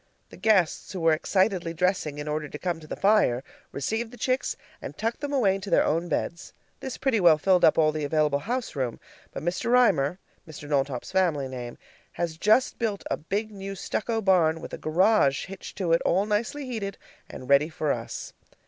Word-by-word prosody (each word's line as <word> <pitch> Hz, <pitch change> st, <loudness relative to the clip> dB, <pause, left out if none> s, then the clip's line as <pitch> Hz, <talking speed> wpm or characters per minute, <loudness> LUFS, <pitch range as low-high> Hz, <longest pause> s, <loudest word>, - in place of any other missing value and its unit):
The -, -, -11 dB
guests, 195 Hz, -7 st, +2 dB
who 190 Hz, -, -4 dB
were 165 Hz, -1 st, +4 dB
excitedly 185 Hz, 0 st, 0 dB
dressing 180 Hz, -4 st, 0 dB
in 145 Hz, 0 st, -5 dB
order 150 Hz, 0 st, -3 dB
to -, -, -7 dB
come 175 Hz, 0 st, -2 dB
to 155 Hz, -, -13 dB
the -, -, -5 dB
fire, 195 Hz, -, +3 dB, 0.3 s
received 220 Hz, -, -2 dB
the 245 Hz, -, -13 dB
chicks 255 Hz, +3 st, -1 dB, 0.2 s
and -, -, -8 dB
tucked 225 Hz, +4 st, -2 dB
them 290 Hz, -1 st, -3 dB
away 240 Hz, -9 st, +3 dB
into 195 Hz, +1 st, -5 dB
their -, -, +4 dB
own 170 Hz, +3 st, 0 dB
beds. 170 Hz, +2 st, -3 dB, 0.3 s
This 265 Hz, -, -6 dB
pretty 265 Hz, -5 st, +1 dB
well 170 Hz, -4 st, +6 dB
filled 180 Hz, +3 st, +3 dB
up 155 Hz, -, +6 dB
all 155 Hz, -1 st, +4 dB
the 155 Hz, 0 st, -4 dB
available 150 Hz, -1 st, +1 dB
house 240 Hz, -, -3 dB
room, 130 Hz, -4 st, -2 dB, 0.3 s
but -, -, -7 dB
Mr. 175 Hz, +7 st, -1 dB
Reimer 180 Hz, -, +3 dB, 0.3 s
(Mr. 150 Hz, -2 st, -9 dB
Knowltop's 135 Hz, -3 st, -1 dB
family 170 Hz, -8 st, +1 dB
name) 125 Hz, -2 st, -7 dB, 0.4 s
has 170 Hz, -2 st, -3 dB
just 215 Hz, +9 st, +2 dB
built 215 Hz, -4 st, -2 dB
a -, -, +3 dB
big 205 Hz, +7 st, -3 dB
new 195 Hz, -1 st, -7 dB
stucco 225 Hz, +4 st, -2 dB
barn, 170 Hz, -5 st, +3 dB
with -, -, -9 dB
a -, -, -5 dB
garage 165 Hz, -3 st, +2 dB
hitched 195 Hz, -1 st, -10 dB
to 180 Hz, -4 st, +1 dB
it, 165 Hz, -, +3 dB
all 190 Hz, +4 st, +2 dB
nicely 220 Hz, +7 st, -1 dB
heated, 215 Hz, -6 st, -4 dB, 0.3 s
and 130 Hz, -, -9 dB
ready 140 Hz, +3 st, +4 dB
for 155 Hz, -2 st, -1 dB
us. -, -, -5 dB
180 Hz, 200 wpm, -26 LUFS, 155-210 Hz, 0.4 s, well